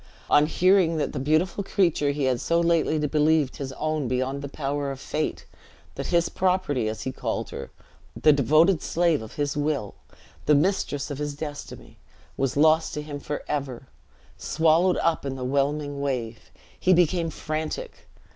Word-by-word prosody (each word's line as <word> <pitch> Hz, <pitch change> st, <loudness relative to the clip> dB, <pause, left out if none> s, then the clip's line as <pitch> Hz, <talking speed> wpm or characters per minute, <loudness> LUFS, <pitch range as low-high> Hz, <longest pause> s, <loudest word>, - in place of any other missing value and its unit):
On 145 Hz, +1 st, +5 dB
hearing 180 Hz, -1 st, +3 dB
that 150 Hz, -, -2 dB
the 145 Hz, -, -3 dB
beautiful 160 Hz, +8 st, +1 dB
creature 170 Hz, -7 st, +1 dB
he 140 Hz, 0 st, -1 dB
had 130 Hz, -2 st, +1 dB
so 170 Hz, +3 st, +1 dB
lately 170 Hz, -2 st, +2 dB
believed 150 Hz, -1 st, +2 dB
his 135 Hz, -2 st, -5 dB
own 155 Hz, -1 st, -2 dB
beyond 130 Hz, +3 st, -1 dB
the 140 Hz, -, -6 dB
power 140 Hz, 0 st, -3 dB
of 135 Hz, -1 st, -6 dB
fate; 155 Hz, +3 st, -3 dB, 0.5 s
that -, -, -5 dB
his 170 Hz, -1 st, +2 dB
property, 180 Hz, -11 st, 0 dB
as 110 Hz, -, -5 dB
he 130 Hz, -, -3 dB
called -, -, -4 dB
her, -, -, -7 dB, 0.5 s
the 155 Hz, -, +6 dB
devoted 155 Hz, +6 st, +4 dB
slave 170 Hz, -4 st, +1 dB
of 110 Hz, -, -9 dB
his 145 Hz, -1 st, -1 dB
will, 145 Hz, -8 st, -1 dB, 0.5 s
the 150 Hz, -, +6 dB
mistress 145 Hz, -3 st, 0 dB
of 140 Hz, -, -5 dB
his 145 Hz, -1 st, -3 dB
destiny, 145 Hz, -1 st, -8 dB, 0.4 s
was 135 Hz, 0 st, -1 dB
lost 160 Hz, +2 st, +3 dB
to 150 Hz, -, -4 dB
him 145 Hz, -1 st, -6 dB
forever! 140 Hz, -3 st, -4 dB, 0.5 s
swallowed 165 Hz, +4 st, +2 dB
up 165 Hz, -1 st, +1 dB
in 135 Hz, -1 st, -3 dB
the 130 Hz, -1 st, -5 dB
whelming 140 Hz, +1 st, -1 dB
wave! 120 Hz, -5 st, -3 dB, 0.3 s
he 185 Hz, -, +4 dB
became 175 Hz, -1 st, +2 dB
frantic. 155 Hz, -, -5 dB
150 Hz, 165 wpm, -25 LUFS, 140-165 Hz, 0.5 s, the